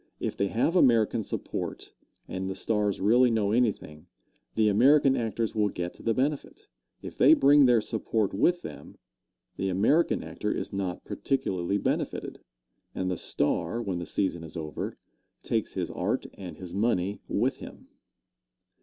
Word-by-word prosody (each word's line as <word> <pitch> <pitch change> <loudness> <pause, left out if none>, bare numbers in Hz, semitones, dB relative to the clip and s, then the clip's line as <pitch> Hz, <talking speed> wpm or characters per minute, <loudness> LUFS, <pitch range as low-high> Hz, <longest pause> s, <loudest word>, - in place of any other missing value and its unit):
If - - -3
they 100 - 0
have 120 - 0
American 115 - +4
support, - - -5 0.3
and 95 +1 -4
the 95 - -4
stars 105 -1 0
really 120 +6 +4
know 110 -3 +1
anything, 105 -10 -1 0.5
the 110 -1 +3
American 135 +6 +5
actors 115 -2 -2
will 105 -1 +1
get 90 -2 -4
the 115 - -2
benefit. 140 +2 -2 0.4
If - - -9
they - - +7
bring 140 0 +6
their 120 -2 +4
support 110 -2 -1
with 175 - +2
them, 70 -1 -10 0.6
the 95 - -1
American 110 - +2
actor 105 - -4
is - - -4
not 95 -2 -3
particularly 95 -8 -1
benefitted, - - -2 0.6
and 95 0 -1
the - - -1
star, 80 +11 0
when 95 -7 -3
the 85 - -6
season 90 -4 -1
is 80 0 -8
over, 75 -2 -5 0.5
takes - - -1
his - - -3
art - - -2
and 90 -3 -9
his 90 -2 -8
money 100 -2 0
with - - 0
him. - - -11
105 Hz, 155 wpm, -27 LUFS, 95-120 Hz, 0.6 s, they